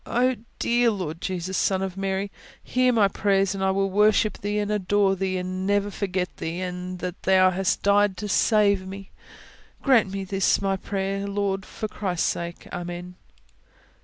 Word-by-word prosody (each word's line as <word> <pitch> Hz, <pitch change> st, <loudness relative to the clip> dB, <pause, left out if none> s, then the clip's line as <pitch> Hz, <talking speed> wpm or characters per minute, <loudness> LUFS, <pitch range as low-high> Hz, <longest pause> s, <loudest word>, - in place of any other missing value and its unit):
Oh, 255 Hz, +2 st, +2 dB, 0.2 s
dear 240 Hz, 0 st, +3 dB
Lord 180 Hz, -6 st, -4 dB
Jesus, 185 Hz, 0 st, -3 dB
Son 190 Hz, 0 st, +1 dB
of 190 Hz, -2 st, -4 dB
Mary, 195 Hz, 0 st, -2 dB, 0.3 s
hear 255 Hz, 0 st, +2 dB
my 220 Hz, -4 st, +4 dB
prayer, 195 Hz, 0 st, +2 dB
and 195 Hz, -1 st, -3 dB
I 190 Hz, -, +3 dB
will 195 Hz, 0 st, 0 dB
worship 210 Hz, +1 st, +3 dB
Thee 205 Hz, +1 st, -2 dB
and 210 Hz, 0 st, -1 dB
adore 205 Hz, -1 st, +2 dB
Thee, 190 Hz, 0 st, -1 dB
and 185 Hz, +1 st, -3 dB
never 205 Hz, 0 st, +1 dB
forget 190 Hz, -2 st, -3 dB
Thee, 165 Hz, +2 st, -4 dB
and 180 Hz, 0 st, -5 dB
that 180 Hz, 0 st, -6 dB
Thou 185 Hz, -1 st, +4 dB
hast 185 Hz, 0 st, 0 dB
died 200 Hz, -1 st, +3 dB
to 210 Hz, -, -4 dB
save 200 Hz, -2 st, +3 dB
me! 195 Hz, 0 st, -9 dB, 0.7 s
Grant 245 Hz, -8 st, +4 dB
me 195 Hz, 0 st, -3 dB
this 195 Hz, 0 st, +1 dB
my 195 Hz, -1 st, 0 dB
prayer, 195 Hz, +1 st, -3 dB
Lord, 200 Hz, -1 st, -2 dB
for 215 Hz, -, -5 dB
Christ's 185 Hz, -5 st, -1 dB
sake, 170 Hz, 0 st, -5 dB
Amen." 175 Hz, 0 st, -6 dB
195 Hz, 170 wpm, -25 LUFS, 185-205 Hz, 0.7 s, my